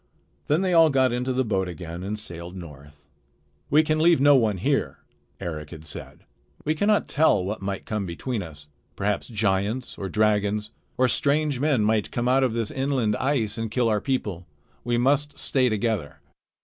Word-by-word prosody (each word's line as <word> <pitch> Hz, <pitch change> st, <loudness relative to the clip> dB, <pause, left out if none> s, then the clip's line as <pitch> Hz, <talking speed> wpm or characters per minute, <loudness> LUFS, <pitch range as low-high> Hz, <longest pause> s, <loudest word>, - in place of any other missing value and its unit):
Then 150 Hz, +5 st, +2 dB
they 185 Hz, -2 st, +1 dB
all 165 Hz, -1 st, +7 dB
got 130 Hz, -3 st, +3 dB
into 125 Hz, +2 st, -1 dB
the 130 Hz, +1 st, +1 dB
boat 95 Hz, -4 st, 0 dB
again 85 Hz, 0 st, -7 dB
and 100 Hz, +3 st, -3 dB
sailed 85 Hz, -3 st, -6 dB
north. 75 Hz, -4 st, -12 dB, 0.6 s
"We 155 Hz, +3 st, +5 dB
can 155 Hz, 0 st, 0 dB
leave 165 Hz, -1 st, +5 dB
no 145 Hz, +1 st, +6 dB
one 110 Hz, -6 st, +2 dB
here," -, -, 0 dB, 0.4 s
Eric 75 Hz, -3 st, -5 dB
had 80 Hz, -2 st, -10 dB
said. 75 Hz, -, -9 dB, 0.4 s
"We 155 Hz, -, +2 dB
cannot 205 Hz, +5 st, +2 dB
tell 145 Hz, -, +3 dB
what 105 Hz, +2 st, -4 dB
might 95 Hz, 0 st, -4 dB
come 105 Hz, -3 st, -3 dB
between 110 Hz, +7 st, -3 dB
us. 75 Hz, -4 st, -9 dB, 0.3 s
Perhaps 100 Hz, +1 st, -1 dB
giants 105 Hz, +2 st, -1 dB
or 95 Hz, -, -4 dB
dragons 105 Hz, +1 st, +1 dB, 0.3 s
or 130 Hz, -, +4 dB
strange 145 Hz, +1 st, +1 dB
men 140 Hz, -6 st, +2 dB
might 110 Hz, -1 st, +1 dB
come 120 Hz, 0 st, -2 dB
out 130 Hz, +1 st, +4 dB
of 125 Hz, -4 st, +1 dB
this 115 Hz, -2 st, -1 dB
inland 130 Hz, -6 st, 0 dB
ice 120 Hz, -6 st, 0 dB
and 115 Hz, -1 st, -2 dB
kill 120 Hz, +1 st, +1 dB
our 105 Hz, -2 st, +1 dB
people. 105 Hz, -10 st, -2 dB, 0.4 s
We 120 Hz, -1 st, 0 dB
must 140 Hz, +3 st, +1 dB
stay 130 Hz, -3 st, +1 dB
together." 110 Hz, -7 st, -2 dB
110 Hz, 180 wpm, -25 LUFS, 95-135 Hz, 0.6 s, all